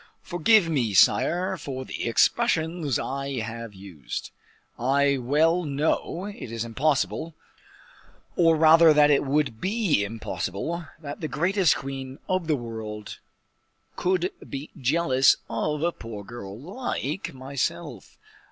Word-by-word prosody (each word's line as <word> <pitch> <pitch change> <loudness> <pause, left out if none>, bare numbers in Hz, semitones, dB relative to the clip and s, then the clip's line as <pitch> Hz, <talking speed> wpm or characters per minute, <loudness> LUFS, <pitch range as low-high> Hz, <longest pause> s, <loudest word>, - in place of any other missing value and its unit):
Forgive 180 +2 +4
me, 125 -10 0
sire, 175 - +3
for 130 -4 -6
the - - -4
expressions 160 - +2
I 140 +1 -3
have 115 -1 -6
used. 95 -9 -7 0.5
I 140 +2 +2
well 160 +8 +2
know 155 +4 -1
it 205 - -7
is 115 0 -3
impossible, 150 +5 -1 1.0
or 165 -2 +4
rather 160 +1 +7
that 150 0 +5
it 140 - +3
would 140 -5 0
be 195 - +1
impossible, 115 - -4
that 145 0 -8
the 155 - -2
greatest 175 +5 +2
queen 135 -1 -6
of 185 -3 -1
the 155 - +2
whole 120 -4 -6
world 110 -2 -7 0.8
could 180 0 0 0.2
be 140 +2 -6
jealous 135 -1 +3
of 150 0 -2
a 170 - +2
poor 115 -8 -8
girl 100 -2 -9
like 175 - -4
myself. 130 0 -4
145 Hz, 125 wpm, -25 LUFS, 120-165 Hz, 1.0 s, rather